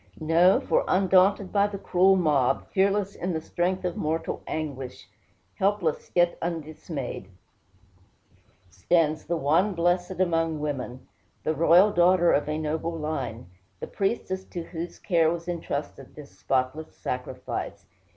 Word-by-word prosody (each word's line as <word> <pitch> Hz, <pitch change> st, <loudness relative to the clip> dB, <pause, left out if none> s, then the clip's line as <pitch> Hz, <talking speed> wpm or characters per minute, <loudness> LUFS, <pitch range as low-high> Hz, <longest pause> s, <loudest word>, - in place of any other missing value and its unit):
No; 165 Hz, +4 st, +4 dB
for -, -, +1 dB
undaunted 190 Hz, +1 st, +3 dB
by 200 Hz, 0 st, +4 dB
the 205 Hz, -1 st, -6 dB
cruel 190 Hz, 0 st, +3 dB
mob, 145 Hz, -7 st, +1 dB
fearless 200 Hz, +1 st, +1 dB
in 180 Hz, 0 st, -3 dB
the 160 Hz, -, -1 dB
strength 180 Hz, +3 st, -2 dB
of 180 Hz, -, -2 dB
mortal 160 Hz, +2 st, -2 dB
anguish, 135 Hz, -5 st, -5 dB, 0.5 s
helpless, 195 Hz, -5 st, 0 dB
yet 175 Hz, -1 st, +3 dB
undismayed, 155 Hz, -, -5 dB, 1.4 s
stands 155 Hz, -, +1 dB
the 170 Hz, 0 st, -1 dB
one 165 Hz, +7 st, +2 dB
blessed 175 Hz, +2 st, 0 dB
among 165 Hz, -3 st, +1 dB
women, 130 Hz, -4 st, -5 dB, 0.4 s
the 155 Hz, -, 0 dB
royal 170 Hz, +6 st, +5 dB
daughter 175 Hz, -1 st, +4 dB
of 145 Hz, -, +1 dB
a 155 Hz, -, -1 dB
noble 160 Hz, +2 st, -2 dB
line, 130 Hz, -, -4 dB, 0.3 s
the -, -, -4 dB
priestess 195 Hz, -2 st, -2 dB
to 175 Hz, -, -6 dB
whose 170 Hz, 0 st, -7 dB
care 165 Hz, -3 st, +2 dB
was 170 Hz, +1 st, -4 dB
intrusted 145 Hz, -5 st, -5 dB
this 150 Hz, -2 st, -11 dB
spotless 135 Hz, +4 st, -2 dB
sacrifice. 125 Hz, 0 st, -5 dB
165 Hz, 130 wpm, -26 LUFS, 150-185 Hz, 1.4 s, royal